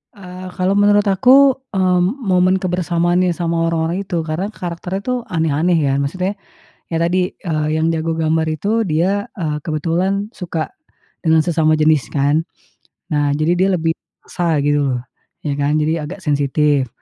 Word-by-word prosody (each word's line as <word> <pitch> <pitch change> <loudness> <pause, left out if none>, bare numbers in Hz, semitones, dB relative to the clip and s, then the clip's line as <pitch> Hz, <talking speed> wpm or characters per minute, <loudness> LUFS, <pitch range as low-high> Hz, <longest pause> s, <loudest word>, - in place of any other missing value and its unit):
Eee, 185 -1 -9
kalau 185 0 +1
menurut 205 0 +4
aku, 255 +7 +5 0.2
eee, 185 -1 +3
m 175 - +3 0.2
momen 185 -1 +3
kebersamaan 175 -1 +1
yang 175 - 0
sama 165 -1 0
orang-orang 165 +4 -1
itu 170 -2 -1
karena 165 +5 -2
karakternya 180 -1 -5
tuh 250 0 -1
aneh-aneh 160 +1 +1
ya, 140 -3 +1
maksudnya, 185 +7 -1 0.6
ya - - -1
tadi, 180 +2 +1
eee, 155 -4 -2
yang 160 +1 +1
jago 165 0 -1
gambar 160 0 +1
itu 205 +8 0
dia, 185 +5 0
eee, 155 -6 -3
kebetulan 180 +6 -1
suka 170 -7 -4 0.6
dengan 160 0 +5
sesama 160 -2 +2
jenis 155 -5 +3
kan. 145 +3 +1 0.7
Nah 145 -1 +1
jadi 155 +3 +1
dia 190 +1 +3
lebih 160 -1 0 0.4
sa 170 -3 0
gitu 145 0 +2
loh, - - -4 0.4
ya 145 - -1
kan 145 +2 +1
jadi 155 0 0
agak 190 +3 -8
sensitif. 145 -1 +1
165 Hz, 160 wpm, -18 LUFS, 155-185 Hz, 0.7 s, aku